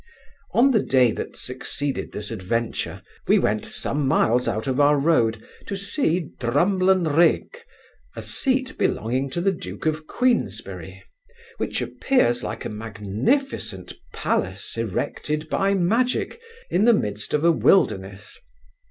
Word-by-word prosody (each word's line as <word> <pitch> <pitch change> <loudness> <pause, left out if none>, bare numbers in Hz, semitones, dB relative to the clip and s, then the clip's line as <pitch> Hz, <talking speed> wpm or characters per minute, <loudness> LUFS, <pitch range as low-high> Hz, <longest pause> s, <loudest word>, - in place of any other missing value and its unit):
On 265 +4 +5
the 220 -5 +3
day 125 -3 +3
that - - -6
succeeded 135 +2 -3
this 105 +1 -5
adventure, 115 +3 -3 0.2
we - - +5
went 105 +1 0
some 135 +6 -2
miles 125 -2 +2
out 110 -1 -1
of 130 0 -1
our 145 0 +5
road 120 -7 +1 0.2
to 200 - -3
see 185 - -1
Drumlanrig, 175 - +2 0.6
a - - -5
seat 260 -1 -1
belonging 130 +5 0
to 150 - -3
the 195 +2 +3
duke 175 - -7
of 155 0 -1
Queensberry, 250 -1 -1 0.5
which - - -2
appears 120 - +1
like - - -5
a - - -2
magnificent 105 - -2 0.2
palace 95 +1 -2
erected 145 +7 -3
by 195 0 +2
magic, 235 - 0 0.3
in 190 +5 +3
the 240 - +7
midst 105 - -1
of 150 +2 +1
a 170 - +7
wilderness. 100 - +1
145 Hz, 130 wpm, -23 LUFS, -, 0.6 s, the